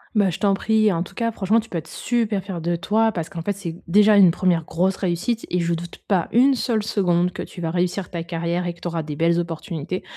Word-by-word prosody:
Bah, 200 -3 +4
je 175 - -4
t'en 200 -1 +3
prie, 215 +1 +2
en 165 - -1
tout 175 - -7
cas 230 -1 0
franchement, 215 +2 +2
tu 225 - -8
peux 175 - -3
être 160 - -12
super 225 -5 -1
fière 185 -4 -5
de 170 +1 0
toi, 220 +5 +1
parce 165 -5 -4
qu'en 165 - -6
fait, 200 +5 -1
c'est 175 -4 -6
déjà 210 +4 +5
une 195 -3 +7
1ère 170 -1 +1
grosse 185 +4 0
réussite 190 +6 -2
et 180 - 0
je 170 0 0
doute 170 +1 -6
pas 185 -5 +1
une 260 +5 +5
seule 230 -4 0
seconde 180 -4 +1
que - - -5
tu 175 - -8
vas 165 -1 -2
réussir 180 +2 -1
ta 170 -2 -3
carrière 170 +1 -2
et 175 - -2
que - - -21
tu 175 - -5
auras 170 -1 -2
des 150 -1 -6
belles 170 +2 +2
opportunités. 170 +1 -4
180 Hz, 260 wpm, -22 LUFS, 170-210 Hz, -, une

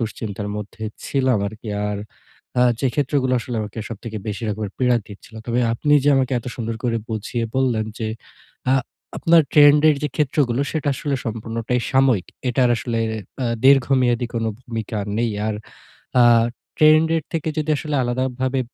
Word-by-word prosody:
দুশ্চিন্তার 105 -2 -4
মধ্যে 105 +2 -8 0.2
ছিলাম 130 -4 +2
আরকি। 110 +1 -10 0.2
আর 105 -1 -3 0.6
আ - - +6 0.2
যে 135 - +2
ক্ষেত্রগুলো 140 -2 +1
আসলে 120 0 -5 0.3
সবথেকে 110 0 -6
বেশি 105 +2 -4
রকমের 105 -1 -4
পীড়া 125 -1 +3
দিচ্ছিল। 105 +2 -13
তবে 120 +1 +1
আপনি 145 +5 0
যে - - +4
আমাকে 130 -1 +1
এত 120 - -10
সুন্দর 115 -1 -3
করে 120 -2 +1
বুঝিয়ে 110 +2 -2
বললেন 125 -5 +1
যে, 110 - -2 0.6
আ - - +5 0.5
আপনার 165 -1 +5
ট্রেন্ড 145 0 +7
এর 150 - +4
যে - - +1
ক্ষেত্রগুলো 135 -3 +1
সেটা 155 -3 -1
আসলে 140 +1 -2
সম্পূর্ণটাই 115 +2 -2
সাময়িক। 130 -8 +3 0.2
এটার 125 0 +3
আসলে 115 0 -2 0.5
আ - - +1 0.2
দীর্ঘমেয়াদী 130 -3 +4
কোন 115 -1 -1 0.2
ভূমিকা 115 -3 -5 0.2
নেই। 120 -1 +1 0.2
আর 110 - -1 0.7
আ - - +8 0.6
ট্রেন্ড 155 +1 +6
এর 160 - -1
থেকে 160 -2 -2
যদি 155 0 -1
আসলে 150 -1 -2
আলাদাভাবে 130 +1 -1
125 Hz, 155 wpm, -21 LUFS, 115-135 Hz, 0.7 s, আ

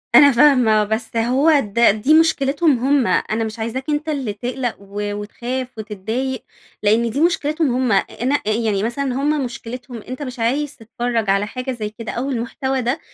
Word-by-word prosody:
أنا 285 -1 +9
فاهمة، 245 -5 +5
بس 220 +2 -3
هو 270 +7 +3
ده 235 -1 +3
دي 215 +9 +2
مشكلتهم 300 -3 +3
هم. 270 0 +2
أنا 220 +1 0
مش 220 +1 -5
عايزاك 230 +4 -3
أنتَ 300 +1 -1
اللي 270 -8 -2
تقلق 245 +3 -3
و 205 +1 -5
وتخاف 240 +5 -4
وتتضايق، 220 +5 -4 0.4
لأن 225 +3 +3
دي 275 +7 -2
مشكلتهم 310 -4 +1
هم. 255 -2 +1 0.3
أنا 260 +4 +2
آآ - - +2
يعني 215 -3 0
مثلًا 240 +5 -2
هم 285 +1 0
مشكلتهم 245 +1 -7
أنتَ 255 +6 -8
مش 255 -3 -6
عايز 275 +6 0
تتفرّج 235 -2 -2
على 200 +1 +2
حاجة 255 +3 -4
زي 220 -4 -4
كده 225 +1 -7
أو 260 +4 -3
المحتوى 265 +2 -2
ده؟ 245 +6 -1
245 Hz, 175 wpm, -20 LUFS, 220-275 Hz, 0.4 s, أنا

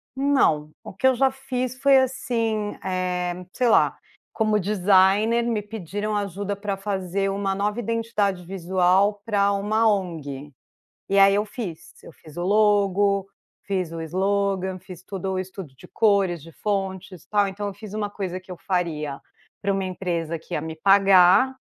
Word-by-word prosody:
Não, 265 - +2
o - - -9
que 260 - +2
eu 260 - +4
já 265 +1 +3
fiz 255 -1 -4
foi 275 -1 +5
assim, 230 -5 -1
eh, 180 -1 -2
sei 250 -2 +1
lá, - - +3 0.4
como 215 -2 +1
designer 205 +4 +3
me 230 -3 -1
pediram 210 0 -4
ajuda 200 0 -3
pra 200 0 -3
fazer 195 -1 -2
uma 195 0 -1
nova 210 +3 -1
identidade 215 -5 -1
visual 190 +2 +1
pra 200 -3 +2
uma 215 +3 +1
ONG, 155 -8 -2 0.6
e 195 0 +2
aí 195 0 +6
eu 210 +1 +1
fiz, 205 -7 -8
eu - - -11
fiz 155 +1 -16
o 175 - -2
logo, 200 -1 +2 0.3
fiz 185 -4 -2
o 165 -1 -5
slogan, 190 +2 -1
fiz 180 -1 -12
tudo 190 -1 -4
o 185 - -1
estudo 185 -6 -7
de - - -15
cores, 200 -6 +2
de 165 +3 -13
fontes 190 -2 -4
tal. 205 -1 +2
Então 205 +1 -4
eu 200 - -5
fiz 205 0 -11
uma 210 -1 -2
coisa 185 -3 -5
que 185 0 -14
eu 180 - -7
faria 155 -7 -2 0.4
pra 200 0 0
uma 195 0 -1
empresa 170 -3 -3
que - - -11
ia 150 - -1
me 160 0 -6
pagar, 195 +7 +5
195 Hz, 165 wpm, -24 LUFS, 180-210 Hz, 0.6 s, aí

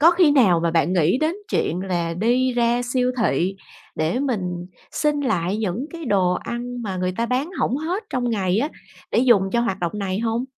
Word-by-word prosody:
có 330 +3 +8
khi 350 -3 +4
nào 205 - +4
mà 170 - +1
bạn 165 +1 +2
nghĩ 175 +5 +3
đến 315 +3 +1 0.2
chuyện 170 +3 0
là 175 -3 -2
đi 245 +7 +2
ra 240 0 +2
siêu 250 +1 0
thị 190 -2 +1 0.4
để 160 +8 0
mình 180 -10 -2 0.3
xin 295 -1 +1
lại 190 -8 0
những 220 +5 -2
cái 335 -1 -7
đồ 190 -7 +2
ăn 245 +4 -5
mà 195 -4 -3
người 185 0 -1
ta 235 - 0
bán 260 +7 -1
hổng 250 - +1
hết 340 +8 -2
trong 245 -2 -1
ngày 190 -3 +1
á, 280 +6 +1 0.4
để - - +1
dùng 240 -5 +5
cho 235 - +2
hoạt 215 -5 -1
động 175 -1 -1
này 195 -2 -2
hông? 230 +2 -1
230 Hz, 210 wpm, -22 LUFS, 185-255 Hz, 0.4 s, có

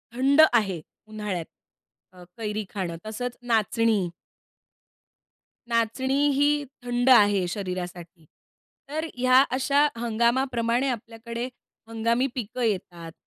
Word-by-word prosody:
थंड 275 +4 +5
आहे 195 -8 +1 0.3
उन्हाळ्यात 210 -6 -4 0.7
अ, 180 -1 -14
कैरी 215 -1 -3
खाणं. 180 -4 -4
तसंच 245 +3 -5
नाचणी 225 -4 +1 1.6
नाचणी 235 +3 0 0.2
ही 290 +1 +2 0.2
थंड 245 +1 0
आहे 205 -6 +5
शरीरासाठी. 180 -3 -6 0.6
तर 310 +2 -3
ह्या 255 +1 +5
अशा 280 +2 +3
हंगामाप्रमाणे 235 +2 +1
आपल्याकडे 235 +1 -5 0.4
हंगामी 230 +3 +1
पिकं 245 +1 -4
येतात. 175 -6 -3
230 Hz, 95 wpm, -25 LUFS, 205-250 Hz, 1.6 s, थंड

